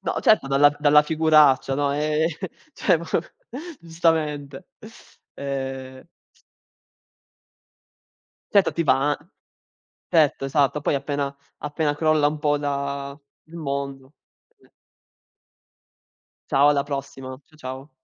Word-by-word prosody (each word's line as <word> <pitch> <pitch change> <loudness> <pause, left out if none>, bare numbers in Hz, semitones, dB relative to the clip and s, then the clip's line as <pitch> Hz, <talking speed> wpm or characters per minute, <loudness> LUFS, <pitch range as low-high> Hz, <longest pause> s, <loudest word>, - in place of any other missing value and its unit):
No - - -2
certo, 215 -10 +4
dalla 140 +1 +5
v 145 - -12
dalla 150 0 +6
figuraccia, 150 -4 +4
no. 140 0 0
Eh, 150 +2 +1 0.5
cioè - - +2 0.8
giustamente. 160 -2 -1 0.7
E 135 0 -6 2.4
Certo, 200 -2 +4
ti 170 - -1
va 145 -1 +2 0.9
Tetto, 150 -4 +2
esatto, 145 +1 +1
poi - - 0
appena 140 0 -3 0.2
appena 150 0 -2
crolla 155 -1 +3
un 150 +1 -2
po' 145 0 +1
da 140 0 -4 0.3
il 160 +2 -14
mondo 140 -2 -5 2.4
Ciao, 140 +2 +5
alla 140 -1 +2
prossima. 135 -2 -6
C 155 - -24
ciao. 130 0 -8
145 Hz, 100 wpm, -23 LUFS, 140-155 Hz, 2.4 s, dalla